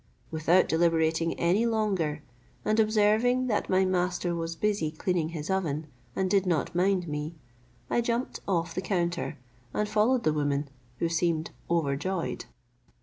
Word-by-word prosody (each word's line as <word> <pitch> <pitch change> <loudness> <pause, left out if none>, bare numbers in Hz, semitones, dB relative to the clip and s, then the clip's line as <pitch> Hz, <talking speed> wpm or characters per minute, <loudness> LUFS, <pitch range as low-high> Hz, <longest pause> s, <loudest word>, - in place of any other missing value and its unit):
Without 165 +3 +3
deliberating 165 0 +2
any 190 +7 +3
longer, 190 -10 0 0.4
and 215 +1 +2
observing 220 +4 +3
that 220 -5 -1
my 190 0 +4
master 180 -1 0
was 165 0 -3
busy 205 -4 0
cleaning 160 +1 -1
his 160 -2 -5
oven, 160 -6 -1 0.3
and 190 - +1
did 195 0 +2
not 165 -5 0
mind 180 0 +2
me, 150 +2 -4 0.5
I 240 - +1
jumped 235 +2 -2
off 170 -4 0
the 185 - -2
counter, 175 -5 -1 0.4
and 210 - +1
followed 220 +4 +2
the 155 - +2
woman, 145 -1 0 0.3
who 170 - 0
seemed 165 -1 0 0.2
overjoyed. 165 +2 -1
175 Hz, 145 wpm, -28 LUFS, 160-205 Hz, 0.5 s, my